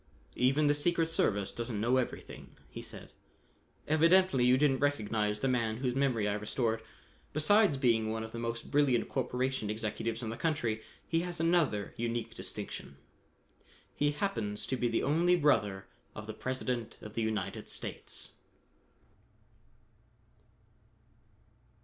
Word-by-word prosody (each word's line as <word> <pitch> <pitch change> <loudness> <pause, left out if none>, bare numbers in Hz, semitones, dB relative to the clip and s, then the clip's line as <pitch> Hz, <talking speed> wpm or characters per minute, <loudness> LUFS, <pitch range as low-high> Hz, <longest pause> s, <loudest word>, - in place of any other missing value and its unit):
"Even 135 +4 +3
the 145 - +5
secret 165 +2 +1
service 100 -11 +1
doesn't 115 -3 -3
know 120 +4 +2
everything," 130 - -5
he - - -7
said. - - -9 0.7
"Evidently 165 -2 +4
you 125 +1 +5
didn't 135 -2 +3
recognize 105 -7 0
the - - +1
man 115 -4 +1
whose 125 0 -1
memory 130 -6 +1
I 105 - +1
restored. 110 +2 -1 0.5
Besides 170 +2 +4
being 115 -4 +2
one 110 0 -2
of 110 - -7
the 115 - -6
most 115 0 -4
brilliant 140 -5 +3
corporation 130 -3 -1
executives 110 +2 -3
in 110 - -3
the 115 - -6
country, 120 -9 -1 0.3
he 165 - +1
has 175 -1 -2
another 165 - +1
unique 115 0 -2
distinction. 70 -9 -6 1.0
He 145 - +1
happens 115 - -2
to 130 - -1
be 120 -1 0
the 115 - 0
only 170 +5 +3
brother 105 - +2 0.3
of 105 - -7
the 110 - -6
President 125 -1 -3
of 105 - -8
the 115 - -1
United 110 -4 -2
States." - - -4
125 Hz, 135 wpm, -32 LUFS, 110-145 Hz, 1.0 s, the